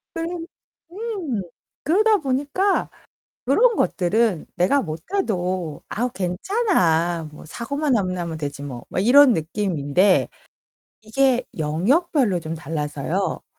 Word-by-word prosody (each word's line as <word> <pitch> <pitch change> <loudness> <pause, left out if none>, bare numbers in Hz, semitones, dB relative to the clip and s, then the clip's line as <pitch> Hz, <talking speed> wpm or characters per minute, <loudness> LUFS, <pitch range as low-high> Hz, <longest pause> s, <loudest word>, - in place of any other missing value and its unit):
네 330 - -3 0.7
음. 375 - -3 0.4
그러다 420 +7 +4
보니까 290 +7 0 0.6
그런 455 - +4
것들은 195 -1 +1
내가 270 +11 +3
못해도 180 - -3
'아우 245 +3 -1
괜찮아. 175 - 0
뭐 150 - -12
사고만 270 - -1
안 190 -3 0
나면 170 -3 -4
되지 145 -1 -5
뭐.' 125 -4 -7
막 - - -2
이런 255 +4 +7
느낌인데. 180 0 +1 0.8
이게 255 +2 +2
영역별로 205 - +1
좀 160 0 -5
달라서요. 155 +3 -3
200 Hz, 225 characters per minute, -22 LUFS, -, 0.8 s, 이런